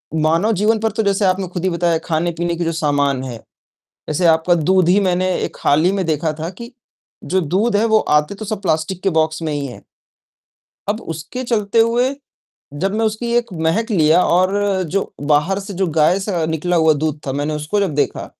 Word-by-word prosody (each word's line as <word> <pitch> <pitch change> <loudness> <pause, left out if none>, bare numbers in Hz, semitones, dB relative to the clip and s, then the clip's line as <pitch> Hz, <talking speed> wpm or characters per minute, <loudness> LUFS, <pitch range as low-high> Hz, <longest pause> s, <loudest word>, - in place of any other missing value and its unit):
मानव 165 +7 +2
जीवन 220 +1 +3
पर 225 0 0
तो 220 +1 -1
जैसे 200 0 +1
आपने 185 0 +1
खुद 180 0 -6
ही 190 - +2
बताया 170 -1 +1
खाने-पीने 170 +1 -1
की 170 - -2
जो 165 - 0
सामान 140 -3 +1
है, 120 -3 -6 0.7
जैसे 165 +4 0
आपका 165 +2 +3
दूध 180 +2 +2
ही 195 +3 +5
मैंने 185 -1 +1
एक - - -4
हाल 150 +3 +3
ही 185 - +4
में 195 -3 -1
देखा 155 0 -1
था 165 +2 -3
कि 235 +2 -8 0.5
जो 185 0 0
दूध 200 +8 0
है 215 +3 +3
वो 220 -1 +4 0.2
आते 150 +7 -6
तो 215 - -7
सब 210 0 -4
प्लास्टिक 165 +1 -1
के 195 - +3
बॉक्स 155 +1 -2
में 155 -2 -2
ही 145 -1 -2
है। 125 - -9 1.1
अब 215 +3 -1
उसके 205 +12 -6
चलते 220 -2 0
हुए, 240 +4 +2 0.6
जब 195 +7 -2
मैं 225 - +1
उसकी 235 +2 -2
एक 235 -4 -1
महक 225 +8 0
लिया 160 -2 +4
और 185 +2 +2 0.4
जो 195 - -1 0.2
बाहर 175 +7 +2
से 195 0 -8
जो 190 - +2
गाय 165 +5 +4
से 180 -5 -1
निकला 160 +2 -1
हुआ 160 -1 +4
दूध 150 -1 -2
था 135 - -2
मैंने 145 +2 -2
उसको 155 +7 -1
जब 185 -7 -1
देखा, 145 - -1
180 Hz, 210 wpm, -18 LUFS, 155-205 Hz, 1.1 s, ही